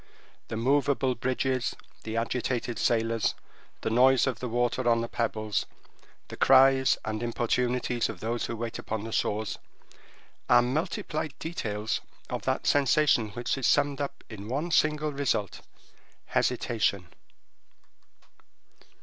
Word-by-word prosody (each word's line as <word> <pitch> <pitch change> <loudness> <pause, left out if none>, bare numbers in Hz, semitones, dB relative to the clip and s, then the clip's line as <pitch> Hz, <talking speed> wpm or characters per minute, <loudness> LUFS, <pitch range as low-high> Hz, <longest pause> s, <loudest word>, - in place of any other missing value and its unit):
The 110 - -4
moveable 135 +1 +2
bridges, 130 +1 -1 0.3
the 110 +1 -3
agitated 120 0 -2
sailors, 115 -1 +1 0.5
the 110 - -2
noise 130 +2 +5
of 130 -4 -2
the 125 - -4
water 120 +1 +1
on 115 0 +3
the 115 - -3
pebbles, 110 -3 -2 0.6
the - - -7
cries 135 0 +5
and 110 0 -3
importunities 120 +1 0
of 105 -5 -7
those 115 +3 -2
who 115 - -4
wait 115 0 -5
upon 110 -1 -4
the 115 - -6
shores, 110 0 -1 0.9
are 120 - +6
multiplied 155 +1 -2
details 110 -10 -3 0.3
of - - -2
that - - 0
sensation 140 -5 +3
which 120 +2 -1
is 130 - +1
summed 145 -1 +2
up 140 0 -5
in 105 -2 -9
one 145 +8 -2
single 150 -1 +2
result—hesitation. 110 -4 -2
120 Hz, 125 wpm, -28 LUFS, 115-135 Hz, 0.9 s, are